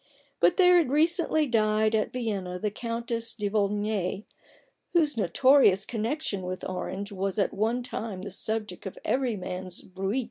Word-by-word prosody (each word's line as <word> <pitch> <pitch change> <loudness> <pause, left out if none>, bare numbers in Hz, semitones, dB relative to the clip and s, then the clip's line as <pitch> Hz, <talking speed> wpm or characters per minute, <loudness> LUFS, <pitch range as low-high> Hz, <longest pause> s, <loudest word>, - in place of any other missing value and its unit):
But 175 +1 +4
there 360 -1 +7
has 330 - +2
recently 315 +2 +2
died 215 -3 +2
at 215 -1 +1
Vienna 200 -7 -3
the 210 +3 -2
Countess 230 +1 -3
de 210 -3 -2
Volnay, 205 -1 0 0.7
whose 310 -5 +3
notorious 220 -1 +4
connection 225 -2 -2
with 185 0 -5
Orange 190 +2 -4
was 195 0 -2
at 200 - +1
one 230 +4 0
time 215 -6 -5
the 200 - -6
subject 210 -1 -4
of 190 - -8
every 255 -3 +1
man's 185 -1 -6
bruit. 195 +6 -2
215 Hz, 150 wpm, -27 LUFS, 195-245 Hz, 0.7 s, there